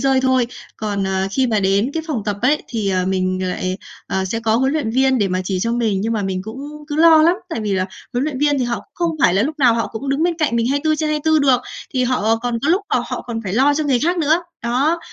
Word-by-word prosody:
rơi 270 Hz, -1 st, +3 dB
thôi. 260 Hz, -2 st, +2 dB, 0.3 s
Còn, 205 Hz, -2 st, -2 dB
ờ, 190 Hz, 0 st, 0 dB
khi 260 Hz, +6 st, +1 dB
mà 220 Hz, -3 st, +1 dB
đến 200 Hz, +5 st, +1 dB
cái 325 Hz, -, -1 dB
phòng 270 Hz, -9 st, -2 dB
tập 205 Hz, -1 st, -2 dB
ấy, 290 Hz, +4 st, +2 dB
thì, 220 Hz, -4 st, -2 dB
ờ, 185 Hz, -1 st, 0 dB
mình 185 Hz, 0 st, -1 dB
lại, 185 Hz, 0 st, -2 dB, 0.3 s
ờ, 190 Hz, 0 st, -1 dB
sẽ 225 Hz, +5 st, -3 dB
có 225 Hz, -1 st, +2 dB
huấn 265 Hz, +2 st, +1 dB
luyện 300 Hz, -8 st, -1 dB
viên 260 Hz, +1 st, +2 dB
để 200 Hz, -, +1 dB
mà 185 Hz, 0 st, -1 dB
chỉ 185 Hz, -1 st, -2 dB
cho 230 Hz, +4 st, 0 dB
mình 225 Hz, -5 st, 0 dB
nhưng 225 Hz, +3 st, -1 dB
mà 215 Hz, -, -1 dB
mình 190 Hz, -1 st, -2 dB
cũng 285 Hz, +8 st, -8 dB
cứ 295 Hz, -, -3 dB
lo 320 Hz, 0 st, +7 dB
lắm. 340 Hz, +3 st, +5 dB
Tại -, -, -3 dB
vì 210 Hz, -2 st, -2 dB
là 185 Hz, -1 st, 0 dB, 0.3 s
huấn 245 Hz, +2 st, 0 dB
luyện 295 Hz, -4 st, -3 dB
viên 290 Hz, 0 st, +2 dB
thì 255 Hz, -, 0 dB
họ 240 Hz, 0 st, -1 dB
cũng 205 Hz, -, -13 dB
không 335 Hz, -2 st, -1 dB
phải 180 Hz, -, +5 dB
là 195 Hz, -, +3 dB
lúc 305 Hz, +5 st, -3 dB
nào 245 Hz, -5 st, +5 dB
họ 230 Hz, -, 0 dB
cũng 235 Hz, +5 st, -6 dB
đứng 275 Hz, +3 st, 0 dB
bên 345 Hz, 0 st, +2 dB
cạnh 290 Hz, -7 st, +1 dB
mình 230 Hz, -, +1 dB
24/24 310 Hz, +2 st, +1 dB
được, 265 Hz, -4 st, +3 dB, 0.3 s
thì 255 Hz, -1 st, +2 dB
họ 225 Hz, -3 st, +1 dB
còn 235 Hz, 0 st, -2 dB
có 290 Hz, -, 0 dB
lúc 370 Hz, +5 st, +3 dB
là -, -, +3 dB
họ -, -, -4 dB
còn 230 Hz, -2 st, -4 dB
phải 185 Hz, -, -3 dB
lo 270 Hz, +6 st, +3 dB
cho 310 Hz, +1 st, -1 dB
người 270 Hz, -4 st, +2 dB
khác 345 Hz, +6 st, 0 dB
nữa, 320 Hz, +3 st, +2 dB, 0.2 s
đó. 270 Hz, +8 st, +1 dB
245 Hz, 280 wpm, -19 LUFS, 205-290 Hz, 0.3 s, lo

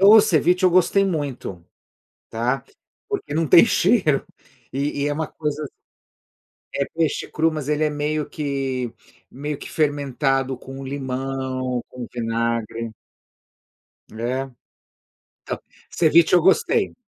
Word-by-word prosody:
O 195 Hz, +1 st, +8 dB
o -, -, +10 dB
ceviche 180 Hz, -2 st, +3 dB
eu 185 Hz, -, +6 dB
gostei 185 Hz, +3 st, +4 dB
muito, 140 Hz, -, -3 dB, 0.7 s
tá, 120 Hz, +4 st, -1 dB, 0.4 s
porque 410 Hz, -, -4 dB
não 160 Hz, +1 st, +1 dB
tem 170 Hz, -, +8 dB
cheiro 155 Hz, -, +3 dB, 0.5 s
e 140 Hz, +1 st, -1 dB
e -, -, +1 dB
é 145 Hz, -, 0 dB
uma 155 Hz, +1 st, -2 dB
coisa 150 Hz, -1 st, -3 dB, 0.9 s
a 140 Hz, -, -5 dB
é -, -, 0 dB
peixe 160 Hz, -3 st, 0 dB
cru, 160 Hz, +1 st, +2 dB
mas 150 Hz, -2 st, -4 dB
ele 150 Hz, +1 st, +2 dB
é 150 Hz, -, +1 dB
meio 150 Hz, +1 st, -2 dB
que 135 Hz, -5 st, -2 dB, 0.4 s
meio 145 Hz, +2 st, -4 dB
que -, -, -9 dB
fermentado 135 Hz, -3 st, 0 dB
com 135 Hz, +1 st, -9 dB
limão, 130 Hz, -2 st, -3 dB
com 125 Hz, -2 st, -7 dB
vinagre 115 Hz, -1 st, -2 dB, 1.2 s
é 125 Hz, +4 st, -2 dB, 0.9 s
Então, -, -, -4 dB, 0.3 s
ceviche 165 Hz, +1 st, +4 dB
eu 175 Hz, -, +6 dB
gostei. 395 Hz, -, +3 dB
140 Hz, 130 wpm, -22 LUFS, 130-160 Hz, 1.2 s, o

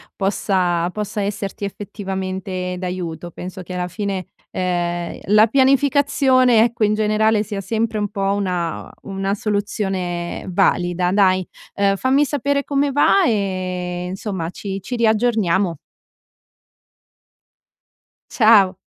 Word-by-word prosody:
possa 185 Hz, -3 st, 0 dB
possa 210 Hz, +1 st, -3 dB
esserti 200 Hz, 0 st, -3 dB
effettivamente 190 Hz, -2 st, -4 dB
d'aiuto. 180 Hz, -2 st, -5 dB
Penso 185 Hz, +2 st, -8 dB
che 180 Hz, -, -8 dB
alla 180 Hz, 0 st, -2 dB
fine, 195 Hz, -1 st, -4 dB, 0.2 s
ehm, 175 Hz, -1 st, -2 dB
la 215 Hz, +3 st, +5 dB
pianificazione, 265 Hz, -2 st, +4 dB
ecco, 235 Hz, -1 st, 0 dB
in 210 Hz, -, +3 dB
generale, 215 Hz, 0 st, +2 dB
sia 205 Hz, -1 st, -4 dB
sempre 225 Hz, +1 st, -1 dB
un 205 Hz, -1 st, -1 dB
po', 195 Hz, 0 st, -1 dB
una 180 Hz, -4 st, -2 dB
una 195 Hz, 0 st, -3 dB
soluzione 195 Hz, -4 st, -2 dB
valida, 175 Hz, 0 st, +1 dB
dai. 185 Hz, -2 st, +3 dB, 0.3 s
Uhm, 200 Hz, 0 st, +2 dB
fammi 265 Hz, +7 st, +2 dB
sapere 280 Hz, 0 st, 0 dB
come 280 Hz, 0 st, 0 dB
va 290 Hz, +7 st, +4 dB
e 185 Hz, -, -2 dB
insomma, 190 Hz, -3 st, -4 dB
ci 195 Hz, 0 st, -5 dB
ci 245 Hz, +6 st, -5 dB
riaggiorniamo. 215 Hz, -6 st, +2 dB, 2.5 s
Ciao. 210 Hz, -5 st, +5 dB
195 Hz, 110 wpm, -20 LUFS, 180-220 Hz, 2.5 s, la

